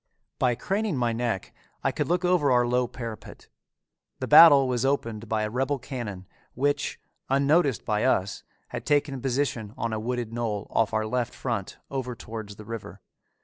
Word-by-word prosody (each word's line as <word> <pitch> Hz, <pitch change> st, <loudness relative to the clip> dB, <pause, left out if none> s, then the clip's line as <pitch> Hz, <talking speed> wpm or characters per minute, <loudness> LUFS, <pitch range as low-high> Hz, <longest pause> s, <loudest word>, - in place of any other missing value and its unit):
By 125 Hz, -1 st, +2 dB
craning 195 Hz, -, -1 dB
my 120 Hz, -2 st, +1 dB
neck, 115 Hz, -5 st, -2 dB, 0.3 s
I -, -, +2 dB
could -, -, -2 dB
look 180 Hz, +1 st, +1 dB
over 175 Hz, -5 st, +3 dB
our 125 Hz, -1 st, +4 dB
low 125 Hz, +1 st, +1 dB
parapet. 115 Hz, -3 st, -8 dB, 0.7 s
The -, -, -3 dB
battle 145 Hz, -5 st, +9 dB
was 125 Hz, -1 st, 0 dB
opened 115 Hz, -5 st, -1 dB
by 110 Hz, -1 st, 0 dB
a 105 Hz, -, -1 dB
rebel 135 Hz, +4 st, 0 dB
cannon, 120 Hz, -8 st, -6 dB, 0.3 s
which, 145 Hz, +2 st, 0 dB, 0.3 s
unnoticed 140 Hz, 0 st, +2 dB
by 105 Hz, -1 st, 0 dB
us, 100 Hz, -6 st, +1 dB, 0.3 s
had -, -, -5 dB
taken 145 Hz, -3 st, +1 dB
position 125 Hz, -5 st, -1 dB
on 115 Hz, -1 st, -2 dB
a 110 Hz, -, -1 dB
wooded 120 Hz, 0 st, -3 dB
knoll 110 Hz, -3 st, -2 dB
off 115 Hz, -1 st, +2 dB
our 110 Hz, 0 st, 0 dB
left 120 Hz, +1 st, -2 dB
front 115 Hz, -7 st, -3 dB
over 130 Hz, -3 st, -3 dB
towards 110 Hz, -2 st, -8 dB
the 105 Hz, -, -11 dB
river. 115 Hz, -1 st, -7 dB
120 Hz, 170 wpm, -26 LUFS, 110-140 Hz, 0.7 s, battle